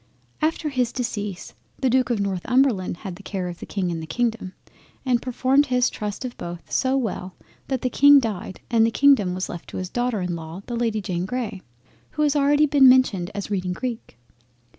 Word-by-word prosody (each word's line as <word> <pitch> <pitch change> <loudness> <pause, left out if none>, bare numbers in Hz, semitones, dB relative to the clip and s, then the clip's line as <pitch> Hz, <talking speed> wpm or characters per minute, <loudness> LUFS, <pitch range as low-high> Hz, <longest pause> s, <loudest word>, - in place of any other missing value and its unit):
After 310 0 0
his 250 -4 0
decease 210 -7 -4 0.2
the 265 - 0
Duke 255 +1 +2
of 235 -3 0
Northumberland 200 +1 +1
had 185 -3 -7
the - - -12
care 190 -3 -4
of 175 -1 -7
the - - -8
King 185 -3 -2
and 165 -1 -4
the 160 - -7
Kingdom, 230 -2 -2 0.5
and 245 -2 +2
performed 260 +3 +2
his 250 -1 +2
trust 210 +4 -5
of 245 - -6
both 170 0 -8
so 265 0 +1
well 190 -7 -3 0.3
that 260 -3 -2
the 255 - +1
King 285 0 +7
died 210 -6 -4
and 230 -1 +4
the 225 - +4
Kingdom 230 -8 +4
was 185 - -3
left 175 - -8
to - - -7
his 185 -1 -4
daughter 245 -3 -1
in 180 -1 -2
law 165 +3 -8
the 240 - -4
Lady 225 -2 0
Jane 180 -1 -3
Grey, 225 -5 -4 0.5
who 300 - 0
has 295 -2 +3
been 290 - +2
already 290 +2 +4
mentioned 255 -9 +5
as 200 0 -5
reading 185 -2 -1
Greek. 235 - -6
225 Hz, 205 wpm, -23 LUFS, 185-255 Hz, 0.5 s, King